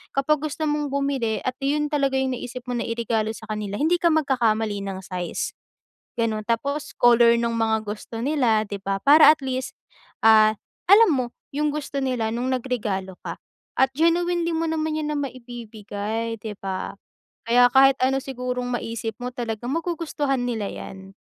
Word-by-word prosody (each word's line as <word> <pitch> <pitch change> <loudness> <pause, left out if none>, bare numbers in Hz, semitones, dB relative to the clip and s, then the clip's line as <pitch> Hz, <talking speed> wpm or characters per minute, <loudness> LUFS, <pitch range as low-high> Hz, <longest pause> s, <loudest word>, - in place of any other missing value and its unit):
kapag 280 +2 +2
gusto 310 +1 -3
mong 295 0 0
bumili 275 -6 0
at 255 - -2
yun 295 +2 +1
talaga 275 -2 +1
yung 265 0 0
naisip 245 +1 -7
mo 245 - -2
na 235 - -1
i-regalo 230 -1 -1
sa 220 - -11
kanila 210 -1 -3
hindi 340 +4 +2
ka 345 - +3
magkakamali 230 -9 +1
ng 190 -1 -4
size. 180 -2 -3 0.7
Ganon 220 -2 -1
tapos, 280 +6 -2
color 235 -1 +6
nung 235 0 -1
mga 220 -1 +1
gusto 215 +2 -6
nila 250 -5 +2
di 200 -1 -5
ba 195 0 -1
para 300 +2 +8
at 305 - -13
least, 260 -1 -3 0.5
ah, 215 -1 +7 0.4
alam 420 +1 +8
mo, 255 -2 0 0.3
yung 300 +1 +1
gusto 285 -2 -4
nila 250 -4 -1
nung 245 +2 -2
nag 255 - -1
regalo 195 -7 -3
ka. - - -5 0.4
At 265 0 +3
genuinely 340 +2 +1
mo 325 0 0
naman 315 -1 -1
yan 300 0 -2
na - - -2
maibibigay 230 -4 -5
di 220 -2 -5
ba? 190 -1 -4 0.5
Kaya 245 +1 +6
kahit 270 0 +7
ano 270 +1 +2
sigurong 250 -1 -4
maisip 225 -1 -4
mo 250 - -2
talagang 240 0 -4
magugustuhan 315 -6 -1
nila 225 -4 -2
yan. 190 0 -9
245 Hz, 170 wpm, -24 LUFS, 220-285 Hz, 0.7 s, para